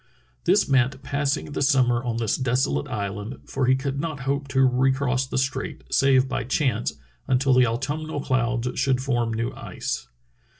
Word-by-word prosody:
This 190 +3 +4
meant 130 0 +2
passing 140 0 -1
the - - -3
summer 130 -4 +3
on 120 -2 -2
this 115 -2 0
desolate 130 +3 0
island, 105 0 -4
for 135 -2 -1
he 130 - +5
could 135 +1 -3
not 155 -3 -3
hope 140 +2 -1
to 135 -1 +1
recross 130 0 +1
the - - -3
strait, 130 +1 -2
save 135 -1 +4
by 130 - -2
chance, 125 -3 0 0.3
until 130 +1 +3
the 125 -1 +5
autumnal 145 +6 -3
colds 125 -2 0
should 135 -2 +2
form 120 -3 0
new 115 +1 -2
ice. - - -5
130 Hz, 165 wpm, -24 LUFS, 125-140 Hz, 0.3 s, he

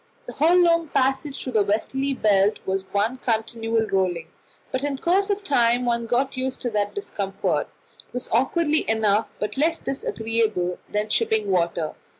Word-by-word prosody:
The - - -8
whole 330 +5 +4
long 335 -2 +4
passage 270 +1 0
through 255 - -5
the 215 - +4
westerly 265 +7 -1
belt 205 -2 +3
was 190 0 -3
one 215 +5 0
continual 225 -1 -1
rolling; 180 -5 -1 0.4
but 260 +1 -2
in 285 -1 -1
course 380 +7 +1
of 405 0 -1
time 245 -6 +2
one 235 -1 0
got 265 +4 0
used 260 0 -3
even 245 - -2
to 215 - -2
that 205 0 -2
discomfort. 200 - -2 0.4
It - - -33
was 250 0 -4
awkward 295 +6 +1
enough, 220 -6 +2
but 210 +5 -4
less 325 +4 +2
disagreeable 220 -8 -1
than 210 +1 -1
shipping 215 -2 +1
water. 170 -3 0
230 Hz, 165 wpm, -24 LUFS, 205-275 Hz, 0.4 s, whole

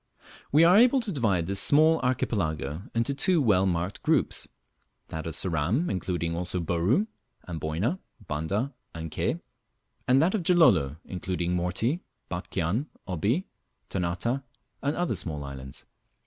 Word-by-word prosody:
We 150 +3 +6
are 175 +4 +7
able 250 +4 +6
to 225 -3 -4
divide 105 - +1
this 100 +2 0
small 155 +8 +5
archipelago 80 - -1
into 115 +5 +1
two 175 +5 +2
well 100 -8 +3
marked 90 +2 -2
groups - - +1 0.6
that 80 0 -5
of 80 - -3
Ceram, 90 - +1
including 85 -3 -2
also 90 +1 -2
Bouru. 90 - +1 0.4
Amboyna, 85 - -2 0.3
Banda, 100 - -2 0.2
and 80 -1 -5
Ke; - - -1 0.7
and 130 +1 +5
that 165 +6 +3
of 215 - 0
Gilolo, 160 - +4
including 90 -1 -2
Morty, 95 - 0 0.3
Batchian, 90 - -2 0.2
Obi, 100 - 0 0.4
Ternate, 95 +9 -1 0.4
and 145 +2 0
other 175 -1 0
small 75 -4 -3
islands. 65 -1 -8
95 Hz, 135 wpm, -27 LUFS, -, 0.7 s, are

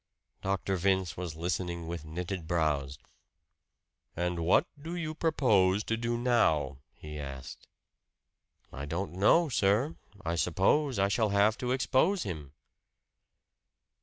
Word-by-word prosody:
Dr. 95 0 -1
Vince 95 -1 +1
was 85 -3 -5
listening 85 0 -2
with 85 -1 -5
knitted 85 +1 -5
brows. 75 -5 0 1.2
"And 90 0 -1
what 85 +2 +4 0.2
do 165 +4 -5
you 160 -3 -3
propose 110 - +2
to 115 - -1
do 120 +1 -1
now," 80 - +2 0.2
he 75 -1 -8
asked. 70 -3 -8 1.1
"I 70 - -5
don't 85 +6 -3
know, 105 - +4
sir. 120 +3 +1 0.3
I 85 +1 -1
suppose 105 - +2
I 100 0 +3
shall 110 +2 +1
have 100 +2 +3
to 125 0 -2
expose 135 +8 +2
him." 75 -7 -6
95 Hz, 125 wpm, -30 LUFS, 80-120 Hz, 1.2 s, what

